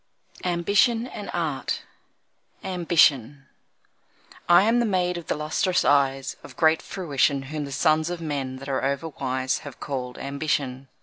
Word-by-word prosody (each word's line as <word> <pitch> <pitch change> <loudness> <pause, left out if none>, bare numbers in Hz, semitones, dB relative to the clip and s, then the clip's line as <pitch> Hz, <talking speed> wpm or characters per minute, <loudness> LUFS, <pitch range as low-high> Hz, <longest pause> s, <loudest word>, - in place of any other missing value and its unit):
Ambition 200 +7 +2
and 210 -5 -8
Art 160 -6 -2 0.8
Ambition 150 -7 +2 1.0
I 175 +2 +7
am 230 +3 +3
the 240 - +2
maid 180 -3 +1
of 170 -2 -7
the - - 0
lustrous 155 +5 0
eyes 135 -1 +2
Of - - -13
great 160 -1 +4
fruition, 140 -6 0
Whom 150 +2 -4
the 140 - -8
sons 155 +3 +2
of 175 -1 -4
men 140 -5 -3
that 135 +1 -9
are 135 -1 -1
over 140 +4 -1
wise 130 -2 -2
Have 140 -4 -10
called 125 -3 -5
Ambition. 140 -2 -2
150 Hz, 145 wpm, -25 LUFS, 135-175 Hz, 1.0 s, I